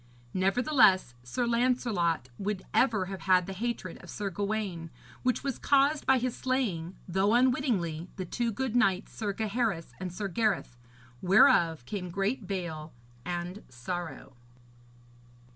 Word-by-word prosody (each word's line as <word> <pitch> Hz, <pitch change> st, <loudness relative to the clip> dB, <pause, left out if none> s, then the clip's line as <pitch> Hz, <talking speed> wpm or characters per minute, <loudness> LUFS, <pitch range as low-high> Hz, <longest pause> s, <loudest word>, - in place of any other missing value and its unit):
Nevertheless, 195 Hz, -, +3 dB
Sir 125 Hz, -, -2 dB
Lancelot 235 Hz, -, +1 dB
would 200 Hz, -1 st, -2 dB
ever 220 Hz, -7 st, +3 dB
have 190 Hz, 0 st, -7 dB
had 180 Hz, -1 st, +5 dB
the 195 Hz, -, -5 dB
hatred 220 Hz, -3 st, -4 dB
of -, -, -13 dB
Sir 200 Hz, -2 st, -4 dB
Gawaine, 200 Hz, -3 st, -3 dB, 0.3 s
which 255 Hz, 0 st, 0 dB
was 275 Hz, -3 st, -3 dB
caused 285 Hz, +2 st, +3 dB
by 265 Hz, -, +6 dB
his 250 Hz, -1 st, -1 dB
slaying, 195 Hz, -10 st, -1 dB
though 190 Hz, +5 st, +2 dB
unwittingly, 225 Hz, -, +1 dB
the 185 Hz, -, -4 dB
two 235 Hz, +6 st, -1 dB
good 250 Hz, +2 st, -3 dB
knights, 195 Hz, -5 st, +2 dB
Sir 210 Hz, -3 st, -2 dB
Gaheris 215 Hz, -4 st, -2 dB
and 185 Hz, -1 st, -4 dB
Sir 200 Hz, +3 st, -3 dB
Gareth; 195 Hz, -, 0 dB, 0.5 s
whereof 170 Hz, -, +5 dB
came 180 Hz, -, -4 dB
great 195 Hz, +4 st, -2 dB
bale 165 Hz, -5 st, -4 dB, 0.3 s
and 175 Hz, +3 st, -4 dB
sorrow. 145 Hz, +4 st, -6 dB
195 Hz, 135 wpm, -29 LUFS, 175-235 Hz, 0.5 s, by